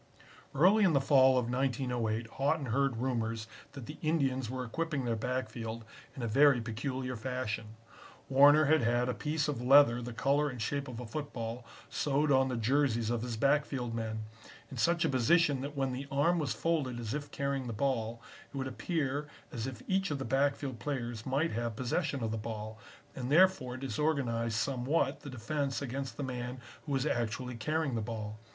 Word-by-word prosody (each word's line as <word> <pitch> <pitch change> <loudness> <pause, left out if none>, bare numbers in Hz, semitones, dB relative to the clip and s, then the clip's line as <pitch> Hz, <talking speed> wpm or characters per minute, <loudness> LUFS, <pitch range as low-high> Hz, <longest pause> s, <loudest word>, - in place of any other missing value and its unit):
"Early 190 +9 +5
in 185 -4 +4
the 140 - +5
fall 135 -1 +5
of 125 -2 +1
1908 125 -3 -1
Haughton 140 +4 0
heard 135 -2 +1
rumors 115 -3 -1 0.3
that 135 -4 -8
the 150 - -9
Indians 135 -6 0
were 130 0 -3
equipping 145 +2 -2
their 115 -1 0
backfield 115 -1 -4 0.3
in 130 - -5
a - - 0
very 135 +3 +5
peculiar 125 +3 -3
fashion. 110 -2 -4 0.5
Warner 145 +3 +7
had 155 +1 +4
had 120 +1 +1
a - - +1
piece 150 +6 -1
of 145 -5 -2
leather 125 -2 +6
the 120 0 -5
color 140 +5 +1
and 125 -3 -7
shape 140 +6 -2
of 125 -2 -7
a 125 - -6
football 120 -3 -5 0.2
sewed 145 +1 +1
on 130 -1 +4
the 125 -2 -2
jerseys 120 -1 +1
of 120 -2 0
his 120 -1 -4
backfield 135 -2 +1
men, 110 -1 -3 0.5
in 135 - -7
such 170 +7 +2
a - - +2
position 140 +2 +3
that 140 +1 -6
when 135 -1 0
the 135 +2 -5
arm 145 +6 +2
was 150 - -1
folded 145 -8 -1
as 115 -1 -4
if 145 0 -4
carrying 140 -2 -2
the - - -3
ball, 115 -1 -1 0.3
it - - -7
would 135 - -2
appear 145 +1 -2 0.2
as 115 +1 -3
if 125 -3 -7
each 190 0 +1
of 145 - -1
the 135 - -4
backfield 135 -1 0
players 120 -5 -4
might 140 +5 +1
have 115 0 -2
possession 130 +2 -1
of 110 - -1
the 110 - -2
ball, 110 0 -6 0.4
and 130 0 -4
therefore 155 -7 +4
disorganize 130 -4 -1
somewhat 135 +4 0
the 145 - -9
defense 135 +3 -2
against 135 0 -4
the 145 - -3
man 125 -1 -4 0.3
who - - -3
was 135 0 +1
actually 125 -1 -1
carrying 145 +4 -1
the 115 - -1
ball. 110 -1 -5
130 Hz, 185 wpm, -32 LUFS, 115-145 Hz, 0.5 s, Warner